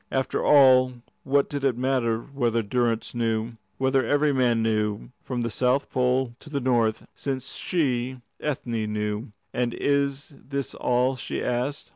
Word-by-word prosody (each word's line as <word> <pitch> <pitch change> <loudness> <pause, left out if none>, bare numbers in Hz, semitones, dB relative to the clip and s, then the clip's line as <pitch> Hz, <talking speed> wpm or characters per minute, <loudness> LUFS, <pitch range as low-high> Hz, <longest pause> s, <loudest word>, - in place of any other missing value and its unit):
After 130 0 -1
all, 130 -3 +6 0.3
what 140 +1 +2
did 145 -1 -4
it 130 -4 +2
matter 125 -3 +1
whether 120 -5 -1
Durrance 115 +1 0
knew, 115 -1 -1 0.3
whether 135 0 +2
every 145 +4 +2
man 120 -4 +2
knew, 110 0 -1
from 125 -2 -3
the 115 - -2
South 125 +4 +1
Pole 125 -1 +1
to - - -13
the 140 -2 -1
North, 120 -4 +1
since 135 -2 -4
she, 130 -6 -1 0.2
Ethne, 115 -7 -2
knew? 105 +1 -2 0.3
"And 120 -1 -1
is 140 +1 0
this 140 -1 -4
all?" 125 +2 +1
she - - -4
asked. 125 +4 -2
125 Hz, 150 wpm, -25 LUFS, 115-135 Hz, 0.3 s, all